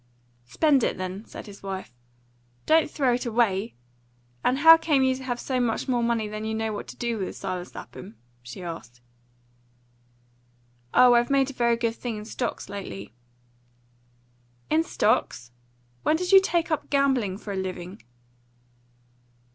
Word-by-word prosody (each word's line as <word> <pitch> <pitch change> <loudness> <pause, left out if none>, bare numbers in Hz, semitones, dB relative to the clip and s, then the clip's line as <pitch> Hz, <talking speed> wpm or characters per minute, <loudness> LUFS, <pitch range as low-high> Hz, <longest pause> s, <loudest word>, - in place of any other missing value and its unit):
"Spend 280 - +3
it, - - 0
then," 185 +3 -5
said - - -9
his 200 -2 -12
wife; 190 -8 -6 0.7
"don't 320 0 +4
throw 270 -5 +1
it 245 +1 -2
away! 225 -2 0 0.7
And 255 - +2
how 325 +3 +9
came 310 -4 +2
you 260 0 +3
to 260 0 -7
have 245 -2 -3
so 255 0 -2
much 240 +1 -1
more 245 -2 +1
money 235 -2 0
than 215 +1 -6
you 220 0 -2
know 220 0 -2
what 205 - -6
to - - -9
do 235 -2 -2
with, 190 - -4
Silas 185 -2 -5
Lapham?" 200 +5 -10 0.3
she 125 +9 -9
added. 165 -8 -8 1.9
"Oh, 250 -1 +6
I've 240 0 +3
made 275 -1 +2
a - - -13
very 235 -2 +2
good 230 -1 0
thing 235 -3 -4
in 210 - -8
stocks 240 +2 -4
lately." 105 - -7 1.6
"In 315 +1 +4
stocks? 210 - 0 0.5
When 310 - +2
did 360 +3 -2
you 385 -1 +9
take 345 -3 0
up 315 - -2
gambling 265 -9 +1
for 205 -1 -7
a - - -4
living?" 185 +1 -5
235 Hz, 160 wpm, -25 LUFS, 195-265 Hz, 1.9 s, how